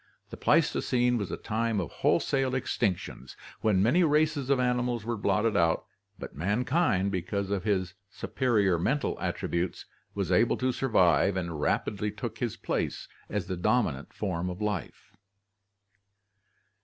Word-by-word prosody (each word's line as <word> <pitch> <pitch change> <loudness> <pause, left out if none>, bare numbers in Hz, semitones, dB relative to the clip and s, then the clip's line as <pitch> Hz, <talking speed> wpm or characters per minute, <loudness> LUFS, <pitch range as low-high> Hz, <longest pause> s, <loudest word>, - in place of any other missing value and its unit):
The - - -7
Pleistocene 125 -1 +2
was 100 - -3
a - - -4
time 115 -1 -1
of 85 - -4
wholesale 135 -2 +1
extinctions, 95 - -2 0.2
when 100 -4 +2
many 140 - +4
races 150 -3 +2
of 140 -2 +3
animals 125 -2 0
were 120 0 -1
blotted 105 +1 +1
out, 85 -4 +2 0.3
but - - -8
mankind, 105 - +1
be 95 -2 -1
cause 100 +2 -3
of 100 -1 -1
his 95 -3 0 0.2
superior 105 -11 +1
mental 135 - 0
attributes, 85 +1 -2 0.3
was 95 -3 -2
able 90 +6 +3
to 130 0 +1
survive 95 - +3
and 85 -4 -3
rapidly 105 +6 0
took - - -6
his - - -2
place - - -3 0.2
as 105 -4 -2
the 95 - -3
dominant 90 - 0
form 90 -3 -3
of 90 +1 -6
life. 105 +1 -4
105 Hz, 145 wpm, -28 LUFS, 95-125 Hz, 0.3 s, many